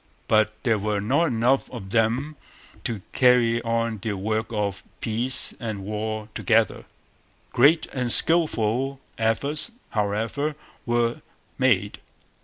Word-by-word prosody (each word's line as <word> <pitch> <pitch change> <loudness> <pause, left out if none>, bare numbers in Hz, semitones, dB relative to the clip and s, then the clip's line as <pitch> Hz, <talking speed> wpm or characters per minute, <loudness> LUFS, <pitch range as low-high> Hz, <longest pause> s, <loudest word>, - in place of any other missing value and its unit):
But 110 0 +3
there 115 -5 +2
were 105 0 -1
not 130 +11 +1
enough 125 0 +1
of 95 -6 -9
them 120 +7 0 0.5
to 110 -5 -3
carry 120 -2 +3
on 115 -1 -1
the 110 0 -2
work 110 +3 -2
of 105 -4 -3 0.2
peace 120 +4 +2
and 110 -5 -5
war 110 +1 -4
together. 115 -1 +1 0.7
Great 150 +6 +4
and 125 -3 0
skilful 135 -5 +3 0.2
efforts, 140 - -1 0.2
however, 110 +8 -1 0.3
were 120 0 0 0.4
made. - - +1
115 Hz, 115 wpm, -24 LUFS, 110-125 Hz, 0.7 s, Great